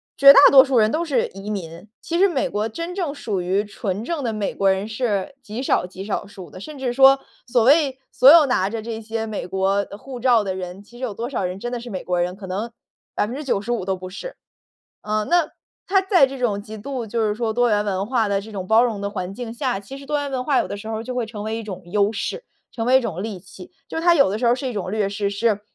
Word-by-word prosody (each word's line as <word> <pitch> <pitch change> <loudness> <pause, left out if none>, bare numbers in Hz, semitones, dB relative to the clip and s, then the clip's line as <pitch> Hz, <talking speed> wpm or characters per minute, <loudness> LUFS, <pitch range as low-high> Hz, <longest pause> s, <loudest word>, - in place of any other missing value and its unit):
绝 275 0 +9
大 - - +8
多 265 -1 +9
数 270 -2 0
人 215 -1 +4
都 320 +2 0
是 305 -5 +1
移 195 +2 -9
民。 175 -1 -6
其 340 +1 -2
实 395 - +6
美 275 -6 0
国 210 +2 -2
真 335 +9 -5
正 345 -7 -2
属 205 -9 -3
于 190 +4 0
纯 200 -1 -4
正 295 +2 -3
的 230 - -1
美 210 -2 -2
国 195 - +2
人 190 +2 -1
是 220 0 -2
极 230 +2 -6
少 180 - +1
极 190 +1 -9
少 205 -1 -3
数 200 -3 -11
的， - - -10
甚 300 +9 -9
至 255 -2 -2
说 270 +1 +6 0.3
所 240 -1 +2
谓 280 +1 +4
所 265 +3 +7
有 330 -2 +8
拿 200 -8 +1
着 225 +1 -4
这 225 0 -5
些 225 0 -4
美 215 -5 -5
国 195 +2 +1
护 255 +3 -9
照 240 -3 +4
的 190 - -2
人， 185 +1 -7
其 240 +4 -16
实 - - -8
有 240 -5 -2
多 235 +3 -4
少 235 -8 -2
人 180 +1 -3
真 240 +4 -5
的 245 - -3
是 240 - -9
美 190 -4 -5
国 180 -1 0
人， 180 +1 -2
可 195 - -10
能 205 +6 -4 0.4
95% 240 -3 -1
都 190 - 0
不 185 0 -8
是。 - - -8 0.7
呃， 215 0 -1
那 345 -2 +3 0.4
他 390 0 +3
在 375 -6 +4
这 270 0 -7
种 210 -5 -1
极 215 +1 -9
度 250 +1 -5
就 230 +2 -2
是 210 - -1
说 225 0 -1
多 245 +1 +2
元 210 -1 +2
文 195 -1 -1
化 230 -3 +1
的 200 -1 0
这 215 +2 -11
种 190 -3 -5
包 220 +3 +5
容 230 -4 0
的 200 - -2
环 185 -1 -5
境 235 0 -6
下 245 -2 -2
其 205 +8 -10
实 275 - -12
多 295 0 0
元 285 -1 -3
文 255 -1 -2
化 280 -2 +1
有 - - +1
的 - - -5
时 215 +2 -8
候 220 - -2
儿 - - -5
就 255 - -5
会 245 -2 -1
成 210 -2 -7
为 220 +1 -2
一 230 - -5
种 190 -3 -7
优 200 +3 +2
势、 460 - -4 0.3
成 225 -1 -3
为 255 - +5
一 - - -1
种 195 -7 -4
利 215 -3 -5
器。 185 0 -13 0.2
就 325 - -3
它 345 +1 +5
有 275 - +4
的 210 - -2
时 240 - 0
候 235 - +5
儿 - - +3
是 260 +1 -5
一 - - -4
种 195 -4 -4
劣 210 -1 0
势， 200 0 -2
是 205 0 0
220 Hz, 295 characters per minute, -22 LUFS, 200-260 Hz, 0.7 s, 绝